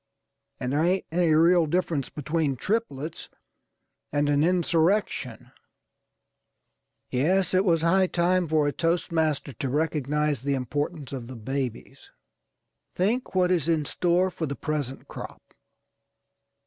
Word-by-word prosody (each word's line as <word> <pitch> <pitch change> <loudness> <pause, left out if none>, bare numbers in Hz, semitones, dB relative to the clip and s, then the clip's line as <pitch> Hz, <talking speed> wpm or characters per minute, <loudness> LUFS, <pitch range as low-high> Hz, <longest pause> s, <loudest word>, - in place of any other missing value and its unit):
And 125 +2 -2
there 150 +2 +2
ain't 185 +3 +1
any 170 -1 +2
real 170 +1 +5
difference 165 -4 -1
between 150 -1 -1
triplets 165 - -3 0.8
and 145 0 +1
an 145 0 +3
insurrection. 175 +3 +1 1.6
Yes, 175 +9 +1
it 185 +1 +4
was 165 -4 +2
high 185 +3 +4
time 175 0 +1
for 155 -1 +2
a - - +1
toast 170 +2 -1
master 155 -4 0
to 130 +4 -4
recognize 150 -1 0
the 140 +1 0
importance 145 +2 -3
of 125 -3 -5
the 130 - -8
babies. 125 +1 -5 0.9
Think 210 +4 0
what 180 -1 +3
is 170 -3 +1
in 160 -3 +1
store 180 +4 +1
for 160 - -4
the 140 - -4
present 145 -4 -4
crop! - - -10
160 Hz, 130 wpm, -26 LUFS, 140-180 Hz, 1.6 s, real